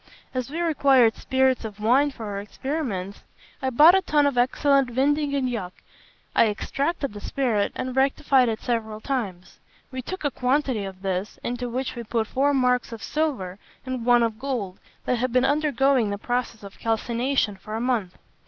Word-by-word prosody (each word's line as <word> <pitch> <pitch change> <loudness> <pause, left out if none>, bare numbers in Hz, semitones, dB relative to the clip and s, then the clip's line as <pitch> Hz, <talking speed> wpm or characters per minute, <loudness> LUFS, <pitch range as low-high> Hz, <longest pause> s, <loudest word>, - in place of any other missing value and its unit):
As 255 0 -3
we 320 +4 -4
required 275 -8 +4
spirits 260 -1 +1
of 215 -2 -7
wine 255 +7 +3
for 235 -5 -8
our 200 -1 -4
experiment, 210 - -4 0.4
I 265 - 0
bought 300 +7 +7
a 385 - +4
tun 295 -5 +2
of 285 -2 +1
excellent 270 +2 +3
vin 265 +4 +2
de 295 0 -1
Gaillac. 250 -10 -2 0.6
I 230 - +5
extracted 280 +6 -2
the 205 - -8
spirit, 230 -7 0
and 255 0 -4
rectified 265 -1 +3
it 220 - -3
several 220 -3 -2
times. 215 -9 -4 0.3
We 260 0 -4
took 375 +8 -6
a 290 - +1
quantity 255 -5 0
of 190 0 -9
this, 190 +1 -2
into 245 0 -3
which 255 +3 -3
we 240 - -5
put 230 0 -1
four 275 +5 +1
marks 250 -3 +1
of 225 -1 -8
silver 250 - -2 0.3
and 255 -2 -4
one 240 0 +5
of 225 -1 -2
gold 240 -9 -3 0.3
that 250 - 0
had 255 +1 0
been 255 +1 +3
undergoing 275 -5 +2
the 200 - -2
process 240 0 -3
of 200 -1 -11
calcination 230 0 0
for 215 +3 -8
a - - -2
month. 230 -7 -1
250 Hz, 180 wpm, -24 LUFS, 220-275 Hz, 0.6 s, bought